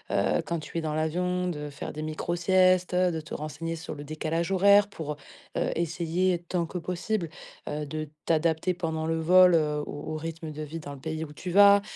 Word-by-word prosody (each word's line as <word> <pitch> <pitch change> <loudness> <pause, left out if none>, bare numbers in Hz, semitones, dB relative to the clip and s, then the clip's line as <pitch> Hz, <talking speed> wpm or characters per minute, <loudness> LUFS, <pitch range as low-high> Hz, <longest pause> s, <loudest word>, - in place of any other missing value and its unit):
heu, - - +2
quand 170 -1 -2
tu 155 +2 -7
es - - 0
dans 155 -1 -2
l'avion 180 +4 0
de 150 -4 -4
faire 140 - -6
des 155 - -5
micro 155 +2 -2
siestes, 185 0 +3
de 180 -3 +2
te 155 - -10
renseigner 165 +2 -4
sur 160 -1 -6
le 145 - -7
décalage 160 +3 -2
horaire 200 +2 +6
pour, 160 -6 -5
heu - - -11 0.4
heu, - - +1
essayer 170 +2 0
tant 175 -2 0
que 170 - -6
possible, 180 +2 -2 0.4
heu, 150 +1 -3
de 155 +1 -5 0.2
t'adapter 165 +2 +2
pendant 160 -2 -2
le 165 0 0
vol, 180 +2 +6
heu, 150 -2 +1
au 145 - -6
au 155 - -2
rythme 165 0 -6
de 150 0 -7
vie 155 +2 -6
dans 145 - -7
le 140 - -10
pays 160 +2 -4
où 150 - -8
tu 180 +4 -6
vas. 200 +1 +8
165 Hz, 215 wpm, -28 LUFS, 155-180 Hz, 0.4 s, vas